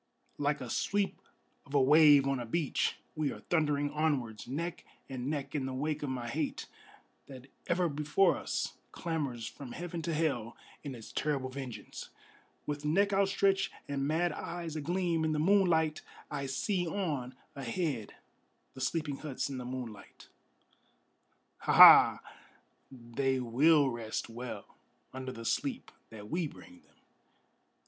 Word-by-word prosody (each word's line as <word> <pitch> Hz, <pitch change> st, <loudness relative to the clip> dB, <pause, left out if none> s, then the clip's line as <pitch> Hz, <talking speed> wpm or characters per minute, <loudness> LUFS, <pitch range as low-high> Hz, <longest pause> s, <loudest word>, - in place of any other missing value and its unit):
Like 145 Hz, -1 st, 0 dB
a 125 Hz, -, -6 dB
sweep 200 Hz, -1 st, -1 dB, 0.4 s
of 140 Hz, -, -8 dB
a -, -, +6 dB
wave 145 Hz, 0 st, +7 dB
on 135 Hz, -1 st, 0 dB
a 120 Hz, -, -4 dB
beach 155 Hz, +4 st, 0 dB, 0.2 s
we 155 Hz, -2 st, 0 dB
are -, -, -8 dB
thundering 145 Hz, -3 st, +1 dB
onwards, 145 Hz, -9 st, -1 dB
Neck 170 Hz, +7 st, -4 dB, 0.2 s
and 130 Hz, -1 st, -4 dB
neck 140 Hz, -2 st, -3 dB
in 140 Hz, -3 st, -1 dB
the 130 Hz, -, -4 dB
wake 150 Hz, +3 st, -2 dB
of 145 Hz, -, -3 dB
my 125 Hz, -2 st, -3 dB
hate, 115 Hz, -, -3 dB, 0.6 s
that 130 Hz, -2 st, -11 dB, 0.2 s
ever 175 Hz, 0 st, +2 dB
before 150 Hz, +5 st, +2 dB
us -, -, -3 dB, 0.2 s
Clamors 140 Hz, -9 st, -3 dB
from 125 Hz, +2 st, -8 dB
heaven 175 Hz, -1 st, -5 dB
to 170 Hz, -, -2 dB
hell 140 Hz, -8 st, -1 dB, 0.3 s
in 140 Hz, -3 st, -5 dB
its 115 Hz, -2 st, -11 dB
terrible 140 Hz, -3 st, -1 dB
vengeance! 130 Hz, -3 st, -7 dB, 0.6 s
With 145 Hz, 0 st, -4 dB
neck 200 Hz, +7 st, +2 dB
outstretched 195 Hz, 0 st, +2 dB, 0.2 s
and 140 Hz, -1 st, -1 dB
mad 170 Hz, +3 st, +1 dB
eyes 170 Hz, -2 st, -5 dB
agleam 170 Hz, +1 st, 0 dB
in 155 Hz, -1 st, +1 dB
the 150 Hz, -, 0 dB
moonlight, 160 Hz, -3 st, +3 dB, 0.3 s
I 140 Hz, -2 st, -3 dB
see 175 Hz, +7 st, -1 dB
on 150 Hz, -9 st, -3 dB, 0.2 s
ahead 135 Hz, -, -3 dB, 0.6 s
the 130 Hz, -, -9 dB
sleeping 145 Hz, +1 st, -1 dB
huts 140 Hz, -2 st, -4 dB
in 130 Hz, -, -4 dB
the 125 Hz, -, -6 dB
moonlight. 125 Hz, -4 st, -8 dB, 1.3 s
Ha! -, -, 0 dB
Ha! -, -, +10 dB, 0.7 s
they 130 Hz, +1 st, -2 dB
will 140 Hz, +4 st, +4 dB
rest 115 Hz, -1 st, -4 dB
well 120 Hz, +2 st, -6 dB, 0.5 s
under 130 Hz, 0 st, -5 dB
the 115 Hz, -2 st, -9 dB
sleep 260 Hz, -, -2 dB, 0.2 s
that 105 Hz, -2 st, -10 dB
we 170 Hz, +5 st, -1 dB
bring 265 Hz, -, -14 dB
them! -, -, -30 dB
145 Hz, 145 wpm, -32 LUFS, 130-165 Hz, 1.3 s, Ha